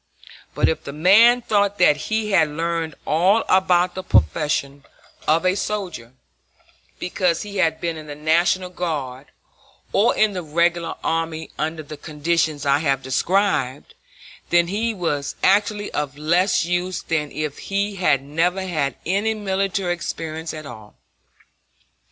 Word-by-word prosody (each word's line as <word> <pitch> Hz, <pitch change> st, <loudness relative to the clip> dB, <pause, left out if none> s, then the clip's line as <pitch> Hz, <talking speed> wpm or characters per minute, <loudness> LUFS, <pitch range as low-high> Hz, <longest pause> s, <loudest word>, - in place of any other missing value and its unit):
But -, -, +3 dB
if -, -, -1 dB
the 140 Hz, -, -7 dB
man 220 Hz, +10 st, +5 dB
thought 205 Hz, -2 st, +1 dB
that 175 Hz, -5 st, +5 dB
he 215 Hz, +7 st, -2 dB
had 165 Hz, -5 st, +4 dB
learned 165 Hz, 0 st, -2 dB
all 185 Hz, +8 st, +3 dB
about 180 Hz, -1 st, +3 dB
the 185 Hz, -, -5 dB
profession 140 Hz, -, +1 dB, 0.4 s
of 165 Hz, +3 st, +3 dB
a 185 Hz, -, +4 dB
soldier 185 Hz, -, -4 dB, 0.8 s
because 180 Hz, -2 st, -1 dB
he 205 Hz, -1 st, -7 dB
had 160 Hz, -4 st, +1 dB
been 170 Hz, -2 st, -3 dB
in 155 Hz, -1 st, -10 dB
the 145 Hz, -, -7 dB
National 170 Hz, +4 st, +1 dB
Guard 145 Hz, -7 st, -4 dB, 0.7 s
or 215 Hz, +5 st, +3 dB
in 215 Hz, -1 st, +3 dB
the 180 Hz, -, -3 dB
Regular 170 Hz, +2 st, 0 dB
Army 165 Hz, -1 st, -2 dB
under 160 Hz, +1 st, -2 dB
the 150 Hz, +1 st, -9 dB
conditions 155 Hz, 0 st, -1 dB
I 140 Hz, 0 st, +3 dB
have 135 Hz, -3 st, 0 dB
described, 145 Hz, -1 st, 0 dB, 0.6 s
then 170 Hz, 0 st, +3 dB
he 220 Hz, +4 st, -1 dB
was 150 Hz, -7 st, -2 dB
actually 205 Hz, +1 st, +2 dB
of 145 Hz, -1 st, -3 dB
less 170 Hz, +5 st, +2 dB
use 180 Hz, +1 st, -2 dB
than 150 Hz, -3 st, -2 dB
if 150 Hz, -2 st, -4 dB
he 200 Hz, 0 st, -1 dB
had 150 Hz, -7 st, +2 dB
never 170 Hz, +6 st, 0 dB
had 150 Hz, -8 st, -1 dB
any 205 Hz, +5 st, 0 dB
military 195 Hz, -3 st, -1 dB
experience 160 Hz, -1 st, -5 dB
at 155 Hz, -1 st, -8 dB
all. 110 Hz, -5 st, -11 dB
170 Hz, 145 wpm, -22 LUFS, 150-190 Hz, 0.8 s, man